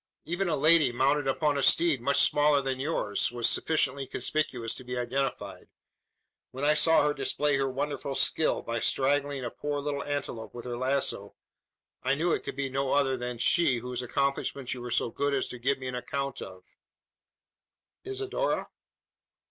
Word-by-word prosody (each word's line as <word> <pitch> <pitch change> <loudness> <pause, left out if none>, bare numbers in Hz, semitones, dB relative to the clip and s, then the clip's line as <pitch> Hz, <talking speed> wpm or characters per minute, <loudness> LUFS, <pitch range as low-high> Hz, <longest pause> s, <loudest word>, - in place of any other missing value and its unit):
Even 175 +2 -1
a 155 - +1
lady, 155 -1 +5
mounted 135 +3 +1
upon 145 +1 +1
a - - 0
steed 160 -3 +3
much 140 +3 +3
smaller 145 0 +3
than 135 -1 -3
yours, 130 -9 0
was 120 -1 0
sufficiently 140 -4 +1
conspicuous 125 -3 -1
to 130 - -9
be 125 0 -5
identified. 130 +3 -3 0.8
When 135 +2 -7
I 150 - +5
saw 160 +1 +5
her 150 - +2
display 145 +1 +1
her 135 0 0
wonderful 140 +1 -3
skill, 160 - +1
by 115 0 -3
strangling 140 +1 0
a 120 - -4
poor 145 0 -3
little 140 0 -3
antelope 130 -7 -5
with 120 - -8
her 120 -1 -4
lazo, 130 -5 -1 0.7
I 135 +2 +1
knew 165 +4 0
it - - 0
could - - -6
be 140 0 -2
no 135 0 -1
other 140 -2 +2
than 125 -1 -5
she 130 +1 +3
whose 125 +1 -4
accomplishments 140 0 -2
you 125 - -7
were 125 - -6
so 120 0 +1
good 140 +2 0
as 135 - 0
to 125 - -7
give 135 +3 +1
me 130 - -9
an 125 - -4
account 135 +2 -4
of." 95 -1 -9 1.4
"Isidora?" 400 +5 -2
135 Hz, 175 wpm, -28 LUFS, 125-145 Hz, 1.4 s, lady